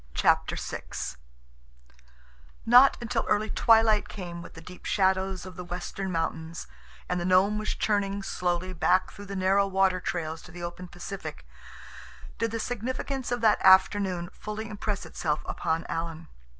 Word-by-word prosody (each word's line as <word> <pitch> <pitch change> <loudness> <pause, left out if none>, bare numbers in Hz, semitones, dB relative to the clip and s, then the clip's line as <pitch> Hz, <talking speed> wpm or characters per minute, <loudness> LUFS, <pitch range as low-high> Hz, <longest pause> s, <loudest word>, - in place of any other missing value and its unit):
CHAPTER - - +3
VI - - -5 1.8
Not 250 +4 +7
until 235 -1 -1
early 215 +1 +1
twilight 220 -2 +4
came 175 -4 -7
with - - -12
the - - -9
deep 180 +2 -12
shadows 190 -1 +1
of 185 -1 -9
the 180 - -6
western 180 +2 -5
mountains, 165 0 -3 0.4
and 180 0 -1
the - - -1
Nome 190 +3 +4
was 215 - -2
churning 200 -1 0
slowly 180 0 -2
back 185 +2 +2
through 205 - -10
the 200 - -5
narrow 195 +1 +3
water 190 -1 +2
trails 160 -3 -3
to 175 - -13
the 175 0 -8
open 175 +1 -6
Pacific, 175 - -7 0.9
did 230 +1 +1
the 230 +1 -3
significance 255 +3 -3
of 245 -1 -1
that 220 -2 +4
afternoon 190 -2 +4
fully 215 +1 -6
impress 210 -1 -3
itself 150 -2 -2
upon 160 +1 -2
Alan. 165 -1 -4
190 Hz, 150 wpm, -28 LUFS, 175-210 Hz, 1.8 s, Not